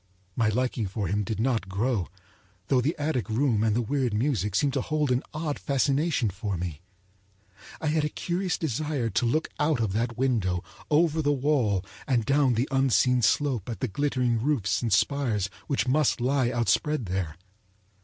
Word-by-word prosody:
My 115 -2 +2
liking 120 -1 -1
for 100 +2 -3
him 100 +4 0
did 110 +1 -4
not 115 -5 0
grow, 100 -1 0 0.6
though 130 -2 +4
the 145 +6 0
attic 145 -6 -1
room 115 -2 +1
and 110 -1 +2
the 120 - +1
weird 125 -2 0
music 105 - 0
seemed 140 +4 +2
to 135 - 0
hold 150 -2 0
an 125 +1 +2
odd 155 -1 -3
fascination 140 - +1
for 100 0 -3
me. 85 -3 -5 1.0
I - - -5
had 155 0 +1
a 150 - 0
curious 180 +4 -2
desire 145 -4 -2
to 120 - +1
look 155 +7 0
out 150 -3 +2
of 110 -4 0
that 115 +2 -1
window, 110 -9 0 0.3
over 160 +1 +3
the 145 -1 +2
wall 130 -9 +1 0.2
and 120 -5 +1
down 140 -2 +3
the 120 +5 0
unseen 125 -2 +3
slope 125 -3 +1
at 115 - -5
the 130 - -1
glittering 125 0 0
roofs 130 -6 0
and 115 -2 -1
spires 105 -2 +1 0.2
which 140 -2 0
must 145 +1 +2
lie 130 0 +1
outspread 120 +4 +1
there. 90 -4 -3
125 Hz, 175 wpm, -27 LUFS, 110-145 Hz, 1.0 s, though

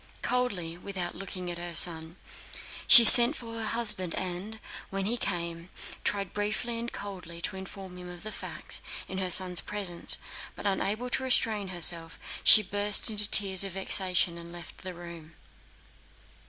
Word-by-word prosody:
Coldly, 190 -10 -3
without 185 -2 -7
looking 185 -2 -8
at 170 - -8
her 175 -1 -7
son, 160 -1 +3 0.7
she 235 - +9
sent 240 +6 +8
for 230 -3 -10
her 225 -1 -5
husband 210 -7 -1
and, 190 +4 -4 0.3
when 195 0 -5
he 225 +4 0
came, 170 -5 -5 0.3
tried 200 -3 -3
briefly 215 +3 -4
and 235 +1 -6
coldly 180 -4 -10
to 190 - -5
inform 190 -1 -11
him 180 0 -11
of 175 -1 -13
the 215 - -7
facts, - - -7 0.3
in 190 - -6
her 185 -1 -3
son's 180 0 +1
presence, 195 -5 -3 0.4
but - - -11
unable 210 +5 -3
to - - -1
restrain 220 -5 +3
herself 170 -2 0 0.3
she 215 - +8
burst 205 +3 +2
into 210 -1 +1
tears 195 -2 +5
of 195 -2 -6
vexation 185 -2 -1
and 170 0 -12
left 175 -1 -11
the 185 -1 -9
room. 170 -2 -13
190 Hz, 160 wpm, -26 LUFS, 175-210 Hz, 0.7 s, she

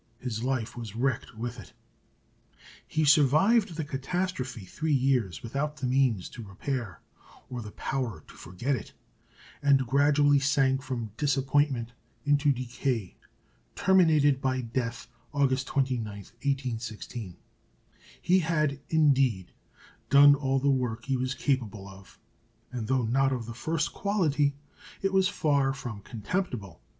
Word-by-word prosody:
His 115 -3 -4
life 125 -3 -2
was 115 -4 -7
wrecked 125 -2 -1
with 120 +2 -5
it. 85 -7 -13 1.1
He 155 0 0
survived 160 - +4
the 160 - -2
catastrophe 135 - -3
three 155 - -1
years 125 - +1
without 145 +6 -3
the 135 - -4
means 125 -7 +2
to 120 - -9
repair, 105 - -5 0.5
or 125 -1 -4
the 105 - -7
power 115 - -3
to - - -15
forget 120 - -3
it, 115 - -8 0.7
and 140 -2 +4
gradually 145 +2 +4
sank 135 -1 +2
from 120 -5 -4
disappointment 135 -3 +1 0.3
into 145 0 +3
decay, 125 -5 -2 0.6
terminated 155 -7 +4
by 130 -1 0
death, 120 0 -3 0.3
August 135 -2 +1
29, 130 -4 0
1816. 115 -2 -5 0.8
He 185 +2 +3
had, 155 -4 0
indeed, 135 - +2 0.6
done 145 +1 +8
all 135 -1 0
the 140 +1 +2
work 125 -4 -1
he 135 - 0
was 130 +1 -1
capable 115 -8 -1
of; 95 -1 -14 0.5
and 120 -4 -4
though 130 -1 +1
not 135 +4 +2
of 125 -3 -2
the 115 - -7
first 155 +5 -2
quality, 155 -8 +1 0.5
it 195 0 +1
was 190 -1 +4
far 140 -5 +1
from 120 -6 -7
contemptible. 115 - -4
135 Hz, 130 wpm, -28 LUFS, 115-145 Hz, 1.1 s, done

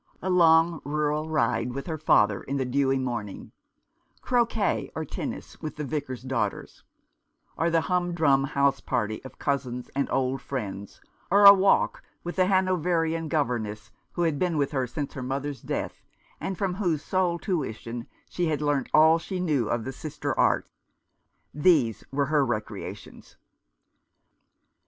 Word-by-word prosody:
A 185 - -2
long 165 -2 +4
rural 150 +1 -1
ride 125 -5 0
with 140 +1 -5
her 160 -3 -4
father 105 -8 +3
in 140 - -3
the 130 - -1
dewy 135 +1 +1
momtng; 120 -6 -4 0.7
croquet 235 -4 +1
or 160 - -3
tennis - - -6
with 155 -2 -5
the 150 - -4
Vicars 135 -3 -4
daughters; 130 -6 -3 0.7
or 165 +2 +1
the 165 -1 +2
humdrum 165 -6 +2
house 140 0 +1
party 110 -4 -2
cf 130 - -11
cousins 125 -3 -3
and 140 - 0
old 130 0 0
friends, 100 -8 -6 0.3
or 200 +2 +5
a 200 - +13
walk 195 0 +2 0.2
with 175 +2 -6
the 185 -1 +4
Hanoverian 175 -4 +1
governess 120 -8 -2 0.2
who 175 - -1
had 160 -4 0
been 175 -3 0
with 140 -2 0
her 130 -3 -1
since 145 +3 -5
her 130 - -6
mother's 135 +2 -4
death, - - -4 0.4
and 190 - -4
from 190 -1 -1
whose 175 -6 -1
sole 185 -2 0
tuition 120 - -4 0.2
she 175 -1 -1
had 155 -3 0
learnt 145 -3 0
all 160 +2 +6
she 185 +2 -5
knew 145 -11 0
of 120 -1 -1
the 130 - -5
sister 155 +3 -4
arts; - - +2 0.5
— - - -49 0.2
these 145 - +3
were 140 +1 +1
her 150 0 +2
recreations. 110 -4 -6
145 Hz, 155 wpm, -26 LUFS, 130-170 Hz, 0.7 s, a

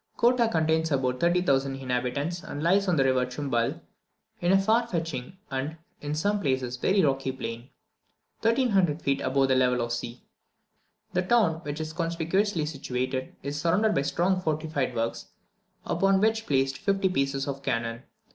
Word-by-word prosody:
Kottah 240 0 +4
contains 160 -1 +1
about 130 -2 0
30,000 140 -6 +2
inhabitants, 135 +6 -2
and 145 -5 -6
lies 195 +4 +3
on 180 - +3
the 135 - +4
river 130 -1 +2
Chumbal, 125 -2 -2 0.6
in 175 +1 +1
a 195 - +6
far 225 +4 +2
stretching 165 - -4
and, 135 +4 -3 0.2
in 145 +1 -3
some 205 +6 +1
places, 130 -4 -1
very 190 +10 +2
rocky 135 -2 +1
plain, 120 -1 -6 0.7
1,300 215 - +2
feet 140 0 +1
above 135 +1 +2
the - - +4
level 125 -1 +3
of 120 0 -2
the - - +1
sea. 120 +1 -7 0.9
The 180 - +2
town, 185 -4 +3
which 150 -2 -5
is 155 0 -4
conspicuously 170 +2 0
situated, 130 -3 -3
is 145 +2 -3
surrounded 195 +7 +2
by - - +2
strong 175 +7 +1
fortified 155 -5 -1
works, 115 0 -2 0.6
upon 195 0 +2
which 220 +2 +2
are - - -19
placed 135 -1 +1
fifty 195 -1 +1
pieces 135 -5 -1
of 140 -1 -4
cannon. 115 -2 -2
150 Hz, 165 wpm, -27 LUFS, 130-185 Hz, 0.9 s, a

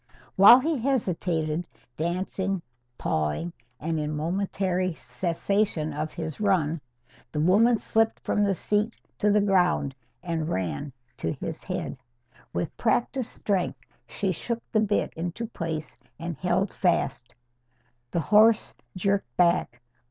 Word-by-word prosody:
While 200 +5 +10
he 305 +1 0
hesitated, 175 - 0 0.3
dancing, 185 +2 -2 0.3
pawing, 80 - -1 0.3
and 160 0 -1
in 150 0 -2
momentary 185 +2 -1
cessation 165 +5 -1
of 155 +1 -3
his 160 -3 -5
run, 170 -7 +1 0.5
the 150 - -2
woman 210 +9 +5
slipped 225 +1 +1
from 210 - +1
the 200 -1 +2
seat 210 +5 0 0.2
to 210 - +3
the 210 0 +4
ground 180 -8 +2 0.3
and 165 -3 -2
ran 95 - -2 0.3
to 80 - -2
his - - -6
head. - - -4 0.5
With 170 - -3
practised 240 +2 +1
strength 195 -3 -1 0.3
she 195 -2 -1
shook 230 +7 -3
the 215 - +3
bit 210 -1 +1
into 175 +7 -4
place 165 -8 -5 0.2
and 170 +1 -4
held 180 +5 0
fast. 170 -9 0 0.7
The 170 - 0
horse 215 +4 +5 0.2
jerked 195 - 0
back. 170 -9 +2
180 Hz, 125 wpm, -27 LUFS, 160-205 Hz, 0.7 s, While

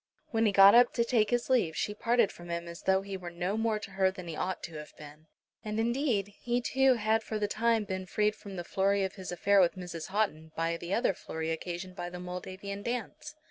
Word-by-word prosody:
When 225 -1 +2
he - - +3
got 195 0 +8
up 245 0 +6
to 235 - +3
take 230 -3 +2
his 245 -1 0
leave 225 -12 +2
she 210 - -1
parted 230 +1 +2
from 175 0 -12
him 170 0 -3
as 170 0 -8
though 190 0 +2
he 195 -1 -5
were 180 -2 -7
no 175 +3 -2
more 225 -1 +1
to 210 -1 -8
her 190 -1 +2
than 185 -2 -8
he 165 - -5
ought 185 +3 -3
to 160 -2 -6
have 150 0 -10
been. 150 +1 -13 0.4
And 215 0 -3
indeed 235 -3 +1
he 240 0 0
too 265 +1 +3
had 220 0 +1
for 220 0 -4
the 210 -1 0
time 225 +1 +1
been 190 -2 -4
freed 210 +3 +1
from 200 -2 -10
the 175 - -4
flurry 195 +2 +1
of 190 - -2
his 190 -3 -7
affair 200 +3 +3
with 175 0 +3
Mrs. 175 -3 -6
Houghton 175 -6 -1
by 165 +1 0
the 170 +1 -7
other 230 0 +2
flurry 160 -2 -4
occasioned 175 +3 -5
by 175 -2 -5
the 180 0 -8
Moldavian 185 +3 -6
dance. 245 +6 -5
195 Hz, 240 wpm, -30 LUFS, 175-220 Hz, 0.4 s, got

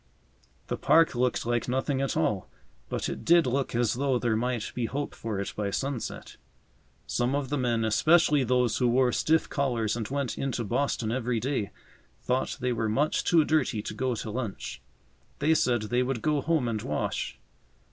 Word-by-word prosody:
The - - -3
park 165 0 +4
looked 125 -1 0
like 120 0 0
nothing 130 +2 0
at 135 +2 -1
all, 105 - 0 0.4
but - - -2
it - - -5
did 170 -1 +5
look 130 0 -1
as 120 -2 +2
though 135 0 +1
there 120 -2 0
might 120 -1 -1
be 120 -2 -1
hope 145 +4 -3
for 110 -3 -4
it 100 - -4
by 105 -1 -1
sunset. 135 +3 -4 0.7
Some 125 +3 0
of 140 -2 -2
the 145 - 0
men, 120 -3 +1
especially 150 +5 +4
those 125 -2 +2
who 125 - +3
wore 125 +1 +3
stiff 160 +5 +2
collars 120 -7 0
and 115 -3 -3
went 140 -2 -3
into 130 -3 -1
Boston 110 0 -1
every 120 -1 -1
day, 125 -5 -1 0.5
thought 125 +1 -1
they 125 -1 0
were 110 -1 -1
much 145 +8 +1
too 165 -3 +4
dirty 135 -9 +1
to - - -5
go 125 +2 -1
to 110 - -5
lunch. 115 -3 -5 0.6
They 155 +3 +3
said 120 -7 +2
they 120 +4 0
would 125 -2 -2
go 150 -2 +1
home 160 -6 +1
and 110 -2 -2
wash. - - -3
125 Hz, 185 wpm, -28 LUFS, 115-140 Hz, 0.7 s, did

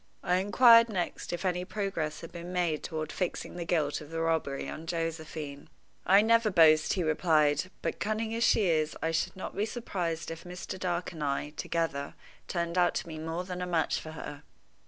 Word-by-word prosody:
I 180 -1 +2
inquired 230 +4 +7
next 185 -5 -3
if 175 +2 -4
any 180 -1 0
progress 195 -6 -3
had 165 - -9
been 175 +1 -7
made 175 -4 0
toward 155 -1 -4
fixing 180 -1 -3
the 175 -1 -4
guilt 155 -4 0
of 150 - -11
the 165 0 -4
robbery 160 -4 0
on 160 +1 -7
Josephine. 160 -3 -4 0.4
"I 195 +3 +7
never 230 0 +4
boast," 155 -4 +5
he 185 - 0
replied. 155 0 +2
"But, - - -2
cunning 220 +1 -1
as 230 +1 0
she 215 - +4
is, 155 -3 +1
I 160 - +1
should 160 +3 -1
not 190 - -6
be 210 +2 0
surprised 175 -9 -3
if 165 - -7
Mr. 180 +1 -7
Dark 175 -1 -2
and 160 -3 -6
I, 145 +1 -1
together, 155 -2 -2 0.3
turned 170 0 -1
out 175 -1 +3
to - - -2
be 160 -2 -7
more 165 +3 -3
than 180 0 -5
a 180 - -2
match 165 -3 +1
for 155 - -8
her." 150 -2 -7
170 Hz, 200 wpm, -30 LUFS, 155-185 Hz, 0.4 s, inquired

